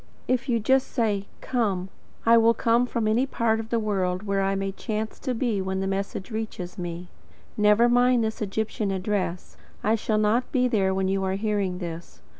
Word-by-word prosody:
If 255 +1 0
you 235 -2 +2
just 260 +5 +2
say: 210 -5 -1
"COME," 200 -7 -1 0.4
I 230 +1 +7
will 230 0 +5
come 235 +1 +2
from 230 -3 -1
any 235 +5 +2
part 225 -4 +1
of 225 0 -6
the 235 - +1
world 190 -4 -1
where 200 -1 0
I 195 0 +1
may 195 0 -2
chance 215 +2 -4
to 255 - -2
be 225 -4 0
when 190 0 -2
the 195 - -1
message 195 +2 -3
reaches 215 -5 -5
me. 175 0 -5 0.5
Never 210 +2 +5
mind 245 0 +4
this 220 0 -3
Egyptian 215 0 -2
address. 190 -2 -2 0.3
I 215 - +3
shall 215 -1 0
not 215 +4 +1
be 255 -4 +2
there 200 -6 +2
when 190 0 0
you 195 0 0
are 190 0 0
hearing 200 -3 -1
this. 170 -2 -7
210 Hz, 195 wpm, -25 LUFS, 195-230 Hz, 0.5 s, I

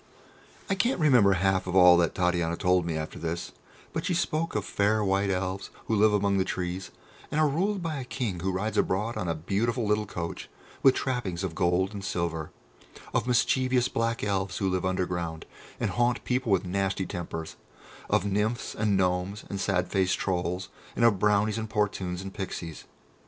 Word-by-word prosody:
I - - +1
can't 235 +4 +1
remember 125 -11 +5
half 95 0 +1
of 90 - -2
all 90 -1 +8
that 85 -1 +1
Titania 85 -2 +1
told 90 -2 +2
me 80 -2 -1
after 80 0 -5
this, 85 +1 -3 0.4
but - - -2
she 180 - 0
spoke 165 -1 -1
of - - -1
fair 105 +1 +1
White 100 0 +1
Elves 95 +1 -2 0.2
who 110 - 0
live 105 +1 +5
among 100 -1 +2
the - - +3
trees, 90 0 -3 0.4
and 150 - -1
are 155 - +5
ruled 185 +6 0
by 160 -3 -2
a - - -4
King 120 -8 -3
who 95 +3 -1
rides 105 +3 -1
abroad 105 +5 0
in 90 - -3
a 85 - 0
beautiful 110 +9 -1
little 105 0 +1
coach 85 -3 -5 0.3
with 135 -1 +6
trappings 105 -9 -2
of 90 -4 -2
gold 90 +2 +1
and 100 -1 -6
silver; 85 -4 -2 0.6
of - - +1
mischievous 125 0 +2
Black 115 0 -1
Elves 100 -2 -1
who 95 - 0
live 95 0 0
underground, 90 -3 -2 0.3
and - - 0
haunt 120 0 +1
people 125 -3 0
with 95 -1 +3
nasty 95 +1 -1
tempers; 80 -3 -5 0.5
of 90 - +2
Nymphs 105 +4 -1
and 105 -2 +1
Gnomes 90 +2 0
and 100 -1 -3
sad 90 -2 +1
faced 95 -2 +1
Trolls, 90 0 -2 0.3
and 115 - +3
of 105 -5 +4
Brownies 105 +2 +2
and 110 -1 -4
Portunes 95 -4 -1
and 95 0 -7
Pixies. 85 -4 -6
95 Hz, 185 wpm, -28 LUFS, 90-110 Hz, 0.6 s, all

